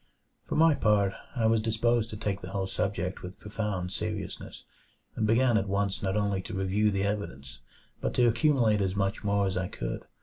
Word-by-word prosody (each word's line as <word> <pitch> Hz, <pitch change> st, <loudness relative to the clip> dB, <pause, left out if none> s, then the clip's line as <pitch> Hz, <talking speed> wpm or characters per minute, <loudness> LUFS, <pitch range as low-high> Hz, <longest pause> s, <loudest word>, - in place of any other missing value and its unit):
For -, -, -3 dB
my 160 Hz, 0 st, +6 dB
part, 105 Hz, -6 st, +2 dB, 0.2 s
I 115 Hz, -3 st, +1 dB
was 110 Hz, 0 st, +3 dB
disposed 115 Hz, +1 st, +1 dB
to 105 Hz, -, -6 dB
take 100 Hz, -2 st, -2 dB
the 90 Hz, -, -7 dB
whole 95 Hz, 0 st, -2 dB
subject 95 Hz, -1 st, -2 dB
with 90 Hz, +1 st, -9 dB
profound 105 Hz, -4 st, -3 dB
seriousness, 105 Hz, 0 st, -5 dB, 0.5 s
and 110 Hz, -, 0 dB
began 120 Hz, +1 st, +4 dB
at 100 Hz, -, -3 dB
once 100 Hz, 0 st, 0 dB
not 95 Hz, +1 st, 0 dB
only 100 Hz, -2 st, 0 dB
to -, -, -7 dB
review 95 Hz, +3 st, +2 dB
the 100 Hz, -1 st, 0 dB
evidence, 70 Hz, -10 st, -4 dB, 0.4 s
but -, -, -2 dB
to 120 Hz, -, +5 dB
accumulate 115 Hz, -4 st, +3 dB
as 95 Hz, 0 st, 0 dB
much 100 Hz, +2 st, -1 dB
more 100 Hz, 0 st, +2 dB
as 95 Hz, -, -1 dB
I 90 Hz, 0 st, -1 dB
could. -, -, -5 dB
100 Hz, 195 wpm, -29 LUFS, 95-110 Hz, 0.5 s, my